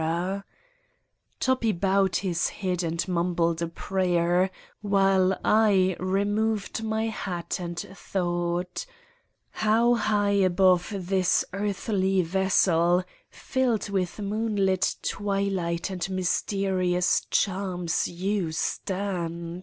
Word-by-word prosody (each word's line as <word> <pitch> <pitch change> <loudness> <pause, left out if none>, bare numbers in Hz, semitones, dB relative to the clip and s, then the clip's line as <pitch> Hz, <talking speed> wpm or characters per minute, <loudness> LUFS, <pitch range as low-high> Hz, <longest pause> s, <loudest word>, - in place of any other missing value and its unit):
203 160 - 0
Satan's 175 +3 -1
Diary 200 0 -5 1.0
Toppi 255 -4 +1
bowed 195 +1 +2
Ms 175 -3 0
head 185 -3 -2
and 170 +1 -2
mumbled 170 -2 0
a 170 - 0
prayer, 180 0 +1 0.3
while 195 -2 +2
I 200 -4 +4
removed 205 +4 0
my 220 0 -1
hat 185 -6 -4
and 175 -1 -5
thought: 175 - -3 0.6
How 225 +3 +3
high 210 -3 +1
above 185 0 +3
this 185 0 +1
earthly 195 -1 0
vessel, 180 -1 +2 0.3
filled 250 -6 -1
with 185 -3 -1
moonlit 205 -2 0
twilight 195 -3 -1
and 180 0 -3
mysterious 185 -1 0
charms, 185 -4 0
you 185 0 -2
stand. 170 -2 -3
190 Hz, 100 wpm, -26 LUFS, 175-200 Hz, 1.0 s, I